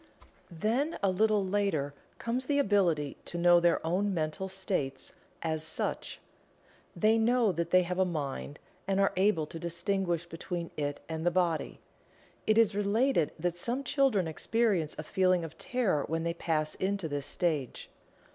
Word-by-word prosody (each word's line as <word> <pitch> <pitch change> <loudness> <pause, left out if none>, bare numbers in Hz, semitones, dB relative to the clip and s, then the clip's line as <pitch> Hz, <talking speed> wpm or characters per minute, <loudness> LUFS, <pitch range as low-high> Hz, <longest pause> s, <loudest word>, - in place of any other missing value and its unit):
Then 230 - -1
a 195 - +3
little 210 +1 +2
later 185 -8 0 0.2
comes 250 +2 -2
the 285 - +2
ability 185 - +2
to 175 - -4
know 175 0 +6
their 170 -1 +2
own 190 +4 0
mental 160 +4 -2
states 180 -9 -2 0.3
as 160 -1 -1
such 155 - -3 0.8
they 220 +1 +3
know 235 -1 +3
that 170 -1 -2
they 185 +1 +5
have 180 +1 -3
a - - +5
mind, 150 -4 -4 0.3
and 195 0 +1
are 195 - +3
able 185 -4 +2
to 165 +2 -8
distinguish 175 0 -1
between 170 0 -5
it 145 -1 -3
and 160 -1 -4
the 175 - +4
body. 175 -3 -1 0.7
It 215 0 +4
is 225 -3 +5
related 205 - +2
that 175 +1 -2
some 240 +9 -1
children 270 - +2
experience 190 -1 0
a 155 - -4
feeling 185 +1 +2
of 160 -1 -7
terror 215 - +1
when 165 +1 -1
they 170 0 -1
pass 155 -2 -1
into 195 -2 -2
this 145 -2 -3
stage. 155 -8 -2
180 Hz, 160 wpm, -30 LUFS, 160-205 Hz, 0.8 s, know